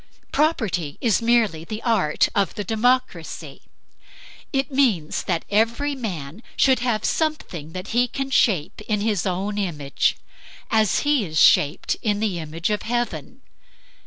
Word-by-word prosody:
Property 220 Hz, -, 0 dB
is 230 Hz, -2 st, +2 dB
merely 230 Hz, -9 st, +2 dB
the 215 Hz, +6 st, -6 dB
art 220 Hz, -10 st, +2 dB
of 200 Hz, -1 st, 0 dB
the 205 Hz, -, -3 dB
democracy. 225 Hz, -6 st, -1 dB, 0.9 s
It 270 Hz, -1 st, -1 dB
means 230 Hz, -, +1 dB
that 170 Hz, -3 st, -1 dB
every 230 Hz, +7 st, +1 dB
man 185 Hz, -, -6 dB, 0.2 s
should 265 Hz, -1 st, +4 dB
have 235 Hz, -4 st, -1 dB
something 185 Hz, -, -2 dB
that 185 Hz, +2 st, -6 dB
he 245 Hz, +2 st, +2 dB
can 270 Hz, +2 st, -4 dB
shape 195 Hz, -, +1 dB
in 210 Hz, -2 st, 0 dB
his 205 Hz, -4 st, 0 dB
own 195 Hz, +3 st, -2 dB
image, 150 Hz, -8 st, 0 dB, 0.5 s
as 220 Hz, -3 st, +3 dB
he 290 Hz, -5 st, +2 dB
is 155 Hz, -4 st, -2 dB
shaped 150 Hz, +3 st, +4 dB
in 205 Hz, -2 st, 0 dB
the 205 Hz, -5 st, -1 dB
image 165 Hz, +4 st, -3 dB
of 210 Hz, -, -1 dB
heaven. 230 Hz, -, -3 dB
215 Hz, 140 wpm, -23 LUFS, 175-240 Hz, 0.9 s, should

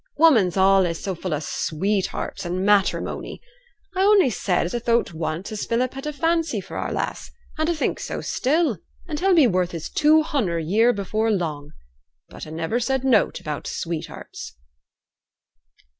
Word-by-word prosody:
'Woman's 235 Hz, -, +4 dB
allays 190 Hz, -3 st, +4 dB
so 195 Hz, -, -3 dB
full 180 Hz, +1 st, -5 dB
o' 150 Hz, -, 0 dB
sweethearts 190 Hz, +6 st, -2 dB
and 180 Hz, +2 st, -2 dB
matteremony. 205 Hz, -1 st, +1 dB, 0.6 s
A -, -, -2 dB
only 390 Hz, -, +5 dB
said 185 Hz, -4 st, 0 dB
as 175 Hz, -, -5 dB
a'd 240 Hz, -1 st, -3 dB
thowt 235 Hz, -6 st, +2 dB
once 160 Hz, +5 st, -4 dB
as 215 Hz, -, -4 dB
Philip 245 Hz, +2 st, 0 dB
had 270 Hz, +2 st, -6 dB
a -, -, -1 dB
fancy 330 Hz, +3 st, 0 dB
for -, -, -9 dB
our -, -, -3 dB
lass, -, -, -3 dB, 0.3 s
and 315 Hz, +1 st, +1 dB
a 340 Hz, -, +1 dB
think 305 Hz, -, -1 dB
so -, -, -4 dB
still; 280 Hz, -, 0 dB, 0.3 s
and 300 Hz, -3 st, -3 dB
he'll 380 Hz, +1 st, +3 dB
be 315 Hz, -5 st, +6 dB
worth 180 Hz, -5 st, +1 dB
his 165 Hz, -2 st, -6 dB
two 310 Hz, +1 st, +4 dB
hunder 220 Hz, -, -1 dB
a 165 Hz, -, -2 dB
year 215 Hz, +9 st, +3 dB
afore 215 Hz, 0 st, 0 dB
long. 155 Hz, -8 st, -2 dB, 0.6 s
But -, -, -9 dB
a -, -, -9 dB
niver 165 Hz, +9 st, -1 dB
said 265 Hz, +1 st, -1 dB
nought 245 Hz, -6 st, +2 dB
about 150 Hz, -4 st, -5 dB
sweethearts.' 165 Hz, -2 st, -6 dB
210 Hz, 175 wpm, -23 LUFS, 175-270 Hz, 0.6 s, be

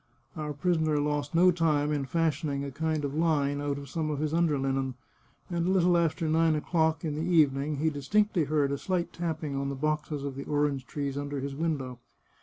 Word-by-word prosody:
Our 150 Hz, -1 st, -4 dB
prisoner 160 Hz, 0 st, +1 dB
lost 145 Hz, +1 st, -1 dB
no 180 Hz, +2 st, +6 dB
time 155 Hz, -4 st, +1 dB
in 145 Hz, -2 st, -1 dB
fashioning 155 Hz, -2 st, 0 dB
a 140 Hz, -, -5 dB
kind 155 Hz, +1 st, -1 dB
of 140 Hz, -, -3 dB
line 145 Hz, -3 st, +1 dB
out 145 Hz, -1 st, -1 dB
of 140 Hz, 0 st, -8 dB
some 155 Hz, +3 st, -2 dB
of 150 Hz, -, -2 dB
his 155 Hz, +1 st, -1 dB
under 165 Hz, -3 st, +2 dB
linen, 135 Hz, -1 st, -1 dB, 0.5 s
and 170 Hz, -1 st, -1 dB
a -, -, +2 dB
little 180 Hz, -2 st, +4 dB
after 165 Hz, -1 st, +1 dB
nine 160 Hz, 0 st, +3 dB
o'clock 160 Hz, +1 st, 0 dB
in 155 Hz, -, -1 dB
the 150 Hz, -, -3 dB
evening 150 Hz, -4 st, +2 dB
he 160 Hz, +3 st, +1 dB
distinctly 175 Hz, +5 st, +1 dB
heard 145 Hz, -1 st, +1 dB
a 140 Hz, -, -2 dB
slight 180 Hz, -2 st, -2 dB
tapping 160 Hz, -4 st, -3 dB
on 140 Hz, 0 st, -1 dB
the 140 Hz, -, -3 dB
boxes 150 Hz, 0 st, -2 dB
of 140 Hz, -1 st, -3 dB
the 140 Hz, -, -6 dB
orange 145 Hz, -3 st, 0 dB
trees 140 Hz, -1 st, -3 dB
under 145 Hz, 0 st, -3 dB
his 140 Hz, +1 st, -4 dB
window. 140 Hz, -6 st, -2 dB
150 Hz, 210 wpm, -29 LUFS, 140-165 Hz, 0.5 s, no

